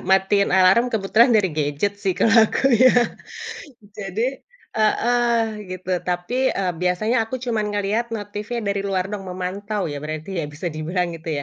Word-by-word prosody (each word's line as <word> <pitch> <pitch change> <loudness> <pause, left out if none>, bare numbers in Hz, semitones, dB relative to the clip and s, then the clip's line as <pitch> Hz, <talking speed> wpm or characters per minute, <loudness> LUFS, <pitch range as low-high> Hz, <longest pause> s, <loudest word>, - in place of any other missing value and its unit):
matiin 195 +1 +3
alarm 190 +6 +5
kebetulan 220 +2 +3
dari 190 -5 +1
gadget 150 +6 -1
sih 190 -3 -1
kalau 225 - +3
aku 270 -1 +1
ya. 255 +3 +6 1.0
Jadi 215 +7 -3 0.3
heeh, 235 +2 +2 0.3
gitu, 185 0 -5
tapi, 180 +9 0
eee, 185 -2 -1
biasanya 200 +7 +1
aku 225 - -5
cuman 230 -4 -1
ngelihat 205 +3 0
notif-nya 210 +3 -5
dari 200 -1 -1
luar 190 -1 -1
doang, 200 -2 -5
memantau 190 +3 -3
ya 145 - -4
berarti 155 +5 -5
ya 150 - -3
bisa 160 +4 -5
dibilang 170 +3 -2
gitu 165 +1 -8
200 Hz, 150 wpm, -22 LUFS, 180-225 Hz, 1.0 s, ya